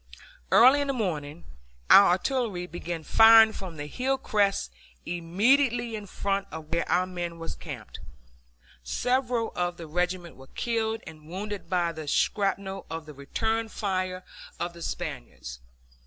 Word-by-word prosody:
Early 260 +5 +7
in 285 - -1
the 275 - 0
morning 170 - -3 0.5
our 200 - +10
artillery 205 -3 -1
began 175 -2 -6
firing 225 +4 +7
from 180 -6 -8
the 145 - -5
hill 260 - -1
crest 200 - 0 0.3
immediately 230 +8 +1
in 210 -1 -7
front 195 +1 -2
of 160 -1 -9
where 170 - -1
our 180 +1 +3
men 175 -2 -5
were 165 0 -7
camped. - - -8 0.8
Several 245 - 0
of 175 0 -1
the 170 - -8
regiment 175 +2 -2
were 135 0 -14
killed 225 -1 -1
and 155 -1 -12
wounded 190 0 -6
by 175 -2 +1
the 155 -2 -8
shrapnel 195 +4 0
of 160 0 -5
the 150 - -10
return 220 +11 -2
fire 185 -3 -2 0.4
of 175 - -3
the 170 - -12
Spaniards. 60 - -6
185 Hz, 145 wpm, -27 LUFS, 165-225 Hz, 0.8 s, our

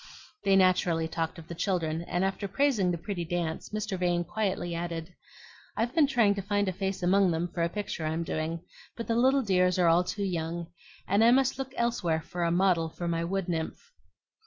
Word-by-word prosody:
They 195 - +4
naturally 180 -3 +3
talked 165 +2 -3
of 165 -1 -11
the - - -6
children, 165 -3 -1
and 175 +2 -1
after 195 +1 -2
praising 210 -2 +2
the 175 - 0
pretty 175 +1 -4
dance 170 -1 -3
Mr. 215 -3 -3
Vane 175 -1 +1
quietly 175 -1 -2
added, 170 0 -4 0.6
"I've 235 +3 0
been 315 -3 +4
trying 235 -7 +3
to 200 - -4
find 205 +1 0
a 185 - 0
face 190 0 -3
among 190 +1 +4
them 165 +1 0
for 170 - -2
a 170 - +2
picture 180 -5 -4
I'm 160 +2 -1
doing; 160 +1 -3 0.4
but 230 - -4
the 230 - 0
little 265 +3 +4
dears 180 -3 +2
are 175 -2 +4
all 170 +2 +4
too 200 +3 -3
young, 170 -1 -3 0.4
and 200 +3 +3
I 230 - +7
must 260 +1 +3
look 265 -1 -4
elsewhere 175 -9 0
for 175 - -6
a 170 - +2
model 175 -2 +2
for 175 +2 -5
my 165 0 0
wood 190 +2 -2
nymph." 175 - -4
180 Hz, 205 wpm, -29 LUFS, 170-205 Hz, 0.6 s, I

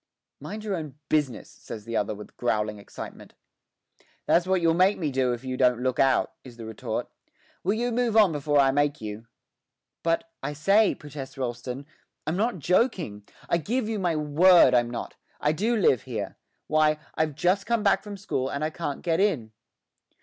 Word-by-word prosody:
'Mind 215 0 -7
your 205 -3 -1
own 155 -5 -6
business,' 145 -7 0
says 105 -2 -9
the 115 0 -4
other 105 0 0
with 105 - -11
growing 105 -3 -1
excitement. 100 - -10 0.9
'That's 175 +1 +3
what 190 0 +3
you'll 165 -1 +3
make 185 +4 +4
me 155 -5 -1
do 130 -1 +1
if 120 +1 -4
you 130 -1 -3
don't 125 -1 +3
look 130 -1 0
out,' 135 -1 +3
is 120 -3 -12
the 115 - -8
retort. 110 +1 -4 0.6
'Will 195 +4 +1
you 240 +2 -1
move 235 -2 +1
on 210 -5 +6
before 145 -1 0
I 135 -1 +5
make 145 +1 +1
you?' 110 +1 -7 0.7
'But, 165 0 0
I 150 - -3
say,' 195 +8 +3
protests 145 -3 -9
Rolleston, 125 +1 -4 0.4
'I'm 155 - -1
not 215 +1 0
joking; 170 - 0 0.2
I 170 - +2
give 230 - -1
you 220 -2 -2
my 175 -3 +1
word 155 +4 +6
I'm 120 -1 +3
not. 120 - -6 0.2
I 150 - +2
do 215 +9 0
live 170 - +3
here. 110 -6 -5 0.3
Why, 155 0 +3 0.2
I've 155 -2 -1
just 185 +6 +1
come 235 -2 +1
back 200 -2 +3
from 205 -1 -8
school, 135 -9 -2
and 140 - -3
I 155 - -1
can't 155 -4 -4
get 165 -1 +1
in.' 155 - +1
150 Hz, 185 wpm, -26 LUFS, 125-190 Hz, 0.9 s, on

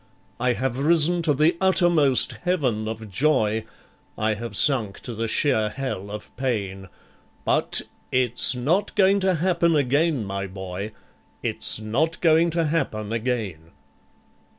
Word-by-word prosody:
I 125 0 +1
have 130 0 -3
risen 170 +3 +3
to 160 -3 +1
the 155 +5 +2
uttermost 175 -8 +4
Heaven 130 -12 -1
of 110 0 -6
Joy, 110 -1 0 0.5
I 110 0 0
have 110 0 -7
sunk 115 -6 +2
to 120 - -7
the 115 +1 -3
sheer 110 -3 0
Hell 115 -6 -6
of 105 +1 -9
Pain 100 -7 -3 0.6
But - - +1 0.3
it's 125 0 +5
not 165 +11 -1
going 195 0 +3
to 190 -1 +1
happen 170 0 +1
again, 145 -2 +1
my 100 0 -4
boy, 95 +2 -7 0.5
It's - - -1
not 135 +10 -2
going 165 0 +3
to 165 0 -1
happen 115 -9 -2
again. 110 -9 -4
125 Hz, 135 wpm, -23 LUFS, 110-160 Hz, 0.6 s, it's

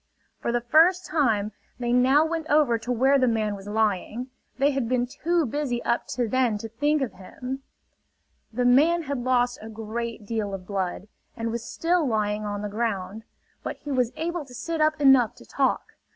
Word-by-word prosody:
For - - -1
the 240 0 0
first 330 +9 +4
time 225 -9 +1 0.3
they 240 -1 0
now 265 +5 +5
went 325 -1 -3
over 285 -6 +3
to 235 +3 -4
where 265 +3 +4
the 255 - +3
man 220 -3 0
was 195 0 -11
lying. 220 +3 -1 0.3
They 280 +2 +3
had 265 -4 -2
been 250 -1 +2
too 335 +6 0
busy 250 -2 -2
up 235 - 0
to 245 -2 -1
then 245 -2 +1
to 225 - -6
think 290 +6 +1
of 230 - -4
him. 250 +8 -7 0.9
The 245 +2 -1
man 310 +8 +4
had 280 -3 -3
lost 245 0 +1
a 220 - -8
great 225 0 -5
deal 205 -2 -2
of 185 -1 -9
blood, 190 0 -3 0.3
and 230 0 -2
was 235 0 -3
still 345 +1 +1
lying 215 -2 0
on 205 0 -3
the - - -2
ground; 210 -1 -3 0.4
but - - -5
he 290 - -7
was 250 -3 +1
able 340 0 -3
to 250 -2 -13
sit 330 +4 -3
up 310 0 +2
enough 265 -5 +5
to - - -15
talk. - - -1
245 Hz, 195 wpm, -25 LUFS, 220-280 Hz, 0.9 s, now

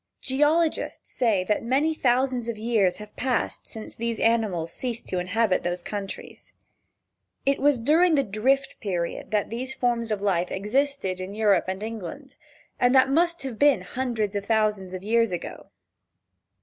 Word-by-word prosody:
Geologists 300 +4 0
say 220 -7 +2
that 210 +3 0
many 275 +7 +1
thousands 255 -3 +1
of 230 - -3
years 215 -5 +1
have 210 0 -11
passed 255 -2 -1
since 220 -1 -8
these 230 -1 -3
animals 215 -8 +1
ceased 240 -2 -4
to 185 - -1
inhabit 185 +2 +1
those 175 0 -3
countries. 200 -2 -7 0.9
It 275 0 +2
was 290 -1 +4
during 320 +7 +4
the 275 - +3
Drift 265 +7 0
Period 175 -5 -3
that 210 -1 0
these 260 +3 -4
forms 235 -2 0
of 215 -2 -1
life 180 -3 +1
existed 210 -1 -1
in 185 +2 -6
Europe 210 -4 +3
and 190 +2 -3
England, 225 - -7 0.4
and 245 +2 +4
that 265 +1 +5
must 340 +1 +2
have 255 -5 -6
been 285 -8 +5
hundreds 220 0 -2
of 200 - -1
thousands 210 -4 0
of 185 - -7
years 230 0 +2
ago. 175 - -6
225 Hz, 160 wpm, -25 LUFS, 200-265 Hz, 0.9 s, that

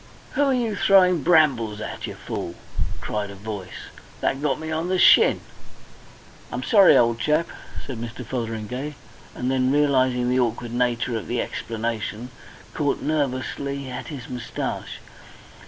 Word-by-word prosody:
"Who - - 0
are 275 - +2
you 230 -4 -1
throwing 185 -4 +5
brambles 130 -10 +3
at, 110 - -5
you - - -7
fool?" - - -5 0.5
cried 105 -1 -3
a 100 - -9
voice. 100 -2 -7 0.4
"That 135 - 0
got 150 -2 0
me 160 0 -5
on 160 +2 -1
the 185 - +2
shin." - - +6 1.1
"I'm 125 +1 -3
sorry, 200 - +7
old 115 -1 +3
chap," 155 +7 +1 0.4
said 125 -4 -6
Mr. 120 +1 -6
Fotheringay, 125 +4 -4 0.4
and 125 +1 -1
then, 130 0 +2
realising 130 -4 +2
the 125 +1 +2
awkward 120 -1 -1
nature 120 -1 0
of 110 - -4
the 120 - -1
explanation, 115 +1 -4 0.4
caught 145 -2 -1
nervously 140 -2 -2
at 125 - -6
his 135 -6 -7
moustache. 120 -1 -5
130 Hz, 145 wpm, -24 LUFS, 115-150 Hz, 1.1 s, sorry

